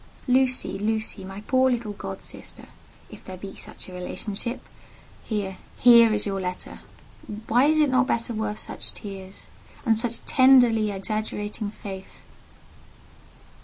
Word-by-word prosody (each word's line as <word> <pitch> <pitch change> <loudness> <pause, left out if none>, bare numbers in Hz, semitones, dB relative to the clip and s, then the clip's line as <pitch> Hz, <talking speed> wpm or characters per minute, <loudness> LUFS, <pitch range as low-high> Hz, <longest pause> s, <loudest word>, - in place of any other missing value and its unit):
"Lucy, 255 -5 +2
Lucy, 215 -1 -2
my 195 +2 -8
poor 260 +3 +3
little 235 -4 -1
god 195 -1 -7
sister - - -10 0.5
(if - - -12
there 185 -1 -8
be 195 +1 -8
such - - -10
a 185 - -10
relationship), 200 +6 -3 0.6
here—here 220 +3 +4
is 210 -1 +1
your 195 -2 -2
letter. 180 0 -5 0.7
Why 245 +4 +4
is 310 +1 +3
it 300 -3 +4
not 260 0 +3
better 235 +1 -1
worth 215 -1 -2
such - - -5
tears, 195 -1 -9 0.4
and 225 -2 +4
such 235 +1 -2
tenderly 245 -5 +5
exaggerating 210 +1 -3
faith?" 195 -2 -9
215 Hz, 130 wpm, -25 LUFS, 195-240 Hz, 0.7 s, tenderly